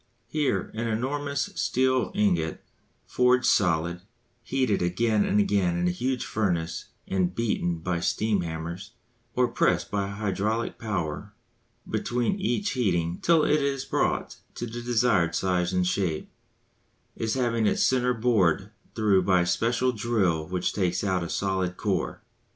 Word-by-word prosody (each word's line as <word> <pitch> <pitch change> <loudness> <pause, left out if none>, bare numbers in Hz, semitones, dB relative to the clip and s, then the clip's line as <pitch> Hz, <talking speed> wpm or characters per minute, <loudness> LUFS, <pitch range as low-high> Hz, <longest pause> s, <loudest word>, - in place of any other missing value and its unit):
Here 140 -11 -1
an 115 +2 -2
enormous 140 +5 -2
steel 130 -1 +1
ingot, 85 -6 +1 0.4
forged 125 0 +3
solid, 85 -2 +2 0.4
heated 125 -3 0
again 105 +5 +2
and 105 - +2
again 95 -4 +2
in 90 0 +1
a - - +2
huge 125 +7 -2
furnace 90 -6 -1 0.2
and 90 -2 0
beaten 100 -6 0
by 85 +1 -2
steam 105 +3 +1
hammers, 85 +5 -6 0.4
or 125 0 +3
pressed - - +1
by 100 -1 0
hydraulic 105 +3 -2
power 95 -9 -3 0.5
between 125 - -1
each 205 +1 0
heating 85 -8 0
till 165 -2 +4
it 150 0 +3
is 135 -1 -1
brought - - -1 0.2
to - - -4
the 120 +1 -6
desired 115 -8 +2
size 90 -1 +1
and 90 -1 +1
shape, 90 -3 -1 0.8
is 110 +1 -1
having 115 -4 +1
its - - +2
centre 125 -1 +2
bored 110 -8 +2 0.2
through 105 -3 +3
by 90 -1 +3
a - - +1
special 115 +8 +1
drill 100 -9 0
which 90 +1 -1
takes 90 -2 0
out 95 -3 +1
a 85 - -5
solid 95 -2 -1
core. - - -2
105 Hz, 145 wpm, -26 LUFS, 90-120 Hz, 0.8 s, till